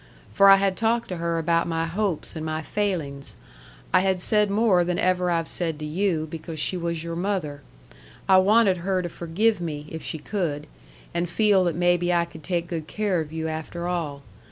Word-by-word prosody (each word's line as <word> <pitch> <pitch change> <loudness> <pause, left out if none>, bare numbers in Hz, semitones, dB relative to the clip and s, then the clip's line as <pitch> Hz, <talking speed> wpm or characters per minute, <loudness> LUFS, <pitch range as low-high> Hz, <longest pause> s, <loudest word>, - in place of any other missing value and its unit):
For 200 0 +6
I 195 - +10
had 195 -1 +1
talked 230 +1 0
to 180 - -4
her 170 0 -1
about 165 +1 +1
my 165 -1 -1
hopes 180 -1 -2
and 160 - -5
my 155 0 -3
failings. 160 -9 -3 0.6
I 185 - +7
had 190 0 +1
said 210 +2 +2
more 200 -3 +3
than 175 0 -1
ever 180 -1 +1
I've 165 -2 0
said 165 -3 -3
to 155 - -6
you, 160 0 0
because 160 0 -7
she 185 - 0
was 170 -2 -3
your 170 0 -4
mother. 170 -6 -2 0.7
I 190 -1 +7
wanted 200 0 +4
her 185 +1 -1
to 175 - -3
forgive 175 +6 0
me, 150 -3 -4
if 160 - -6
she 160 - -4
could, 155 -3 -3 0.5
and 170 0 -1
feel 205 0 +3
that 170 -3 0
maybe 175 0 +2
I 170 -1 +2
could 160 -2 -13
take 175 -1 -1
good 160 -3 -5
care 205 -3 0
of 155 -1 -7
you 160 0 -3
after 160 +2 -4
all. 155 -6 -3
175 Hz, 205 wpm, -25 LUFS, 160-190 Hz, 0.7 s, I